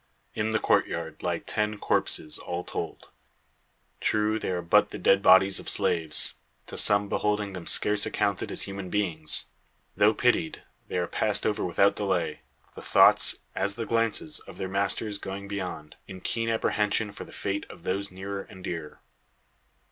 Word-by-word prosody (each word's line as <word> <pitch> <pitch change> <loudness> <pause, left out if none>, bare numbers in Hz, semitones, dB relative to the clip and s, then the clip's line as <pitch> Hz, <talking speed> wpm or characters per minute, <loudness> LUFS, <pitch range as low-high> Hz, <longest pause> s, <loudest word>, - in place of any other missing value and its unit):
In 110 0 -1
the 110 - +1
courtyard 80 -6 0
lie 85 -1 -1
ten 105 +4 -2
corpses, 75 -5 +1
all 90 0 -4
told. - - -6 0.9
True 110 +1 +1
they - - -3
are 90 -1 -2
but 85 - +4
the - - -7
dead 95 0 +3
bodies 95 0 +5
of - - -5
slaves 85 -6 +2 0.3
to - - -9
some 100 0 +5
beholding 105 0 -1
them 90 -3 -8
scarce 105 0 +3
accounted 100 -2 -1
as - - +1
human 100 -1 -6
beings. 85 -6 -1 0.5
Though 105 +2 +4
pitied, 120 -10 +1 0.2
they - - -3
are 90 - +1
passed 105 +3 0
over 105 - 0
without 100 +3 +3
delay; 90 -7 -1 0.3
the - - -10
thoughts, - - +5
as 100 +1 0
the 115 - -4
glances, 115 +7 0
of - - -13
their 95 - -3
masters 100 +2 -2
going 100 +1 -6
beyond, 95 -6 -6
in 95 -2 -9
keen 115 +3 -2
apprehension 105 -1 +1
for - - -8
the - - -14
fate 100 0 -3
of 85 - -13
those 100 +2 -2
nearer 95 +1 -6
and 95 -1 -13
dearer. 80 -4 -6
100 Hz, 165 wpm, -27 LUFS, 90-105 Hz, 0.9 s, bodies